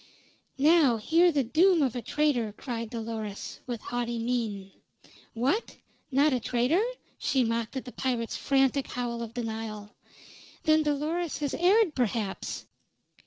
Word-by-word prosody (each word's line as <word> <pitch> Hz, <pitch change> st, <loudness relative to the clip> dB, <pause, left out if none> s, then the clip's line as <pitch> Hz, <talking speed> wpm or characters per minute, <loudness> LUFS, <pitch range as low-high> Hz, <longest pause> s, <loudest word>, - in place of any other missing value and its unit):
"Now 290 Hz, -4 st, +5 dB
hear 330 Hz, +10 st, +4 dB
the 285 Hz, -3 st, +1 dB
doom 325 Hz, +6 st, +4 dB
of 255 Hz, -3 st, 0 dB
a 245 Hz, -, -2 dB
traitor!" 245 Hz, -7 st, 0 dB
cried 230 Hz, -3 st, -4 dB
Dolores, 220 Hz, -3 st, -5 dB
with 240 Hz, -3 st, -4 dB
haughty 240 Hz, -1 st, -3 dB
mien. 225 Hz, -5 st, -2 dB, 0.6 s
"What! 270 Hz, -, 0 dB, 0.3 s
Not 285 Hz, +1 st, +3 dB
a 250 Hz, -, +1 dB
traitor?" 250 Hz, -, +1 dB, 0.4 s
she 265 Hz, -2 st, +2 dB
mocked 230 Hz, +2 st, -2 dB
at 260 Hz, -, -5 dB
the 250 Hz, -, -8 dB
pirate's 240 Hz, -3 st, -2 dB
frantic 270 Hz, 0 st, +2 dB
howl 240 Hz, -2 st, -3 dB
of 230 Hz, 0 st, -7 dB
denial. 220 Hz, -3 st, -5 dB, 0.7 s
"Then 310 Hz, 0 st, +4 dB
Dolores 305 Hz, +3 st, -1 dB
has 290 Hz, -3 st, -2 dB
erred, 380 Hz, 0 st, +4 dB
perhaps. 225 Hz, -5 st, -2 dB
250 Hz, 135 wpm, -28 LUFS, 230-300 Hz, 0.7 s, Now